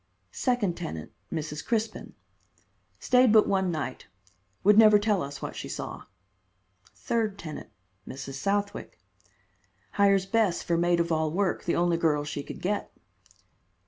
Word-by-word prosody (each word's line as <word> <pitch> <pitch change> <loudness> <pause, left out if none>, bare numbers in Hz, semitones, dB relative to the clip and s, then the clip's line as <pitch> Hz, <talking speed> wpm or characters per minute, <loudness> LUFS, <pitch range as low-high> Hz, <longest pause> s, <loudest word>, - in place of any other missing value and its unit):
Second 235 -9 0
tenant: 80 - -6 0.2
Mrs. 150 -2 -4
Crispin. 225 -1 -3 0.8
Stayed 250 -2 +4
but 215 -1 +6
one 190 -2 +1
night. 155 -6 -4 0.6
Would 210 +1 +6
never 215 -1 +8
tell 205 -2 +1
us 140 0 -6
what - - -5
she - - -6
saw. - - -6 0.9
Third 220 -4 -1
tenant: 155 -6 -8 0.4
Mrs. 135 +1 -7
Southwick. 200 +8 -2 0.9
Hires 195 -2 +3
Bess 200 -3 +1
for 170 - 0
maid 175 0 +2
of 170 0 0
all 160 -1 +1
work, 190 +3 -1
the 170 - +1
only 175 -1 +2
girl 155 -3 +1
she 145 -1 -4
could - - -9
get. 205 +3 -2
185 Hz, 140 wpm, -27 LUFS, 160-210 Hz, 0.9 s, never